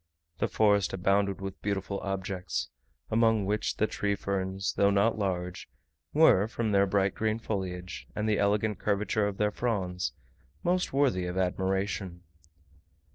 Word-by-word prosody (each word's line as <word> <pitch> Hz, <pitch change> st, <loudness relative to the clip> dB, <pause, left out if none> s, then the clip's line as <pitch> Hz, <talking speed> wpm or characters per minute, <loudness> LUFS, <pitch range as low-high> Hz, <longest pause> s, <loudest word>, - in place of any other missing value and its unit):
The -, -, +2 dB
forest 105 Hz, -2 st, +2 dB
abounded 100 Hz, +1 st, +1 dB
with 95 Hz, -1 st, -6 dB
beautiful 100 Hz, -1 st, -2 dB
objects; 95 Hz, -1 st, -3 dB, 0.4 s
among 110 Hz, -2 st, +3 dB
which 105 Hz, +2 st, -1 dB
the 110 Hz, -, +3 dB
tree 100 Hz, -1 st, -1 dB
ferns, 95 Hz, -1 st, -2 dB
though 100 Hz, -, +3 dB
not 100 Hz, +3 st, +2 dB
large, 90 Hz, -2 st, -3 dB, 0.4 s
were, 100 Hz, +3 st, +5 dB
from 115 Hz, -1 st, -2 dB
their 100 Hz, 0 st, +4 dB
bright 100 Hz, 0 st, +2 dB
green 110 Hz, 0 st, 0 dB
foliage, 95 Hz, -5 st, -4 dB
and 105 Hz, +1 st, -1 dB
the 105 Hz, -1 st, +2 dB
elegant 105 Hz, +1 st, +1 dB
curvature 105 Hz, 0 st, +1 dB
of 100 Hz, -1 st, -4 dB
their 105 Hz, 0 st, +1 dB
fronds, 95 Hz, -6 st, -2 dB, 0.5 s
most 180 Hz, +1 st, +1 dB
worthy 130 Hz, -10 st, +2 dB
of 90 Hz, +1 st, -4 dB
admiration. 95 Hz, -1 st, -1 dB
100 Hz, 140 wpm, -29 LUFS, 95-105 Hz, 0.5 s, were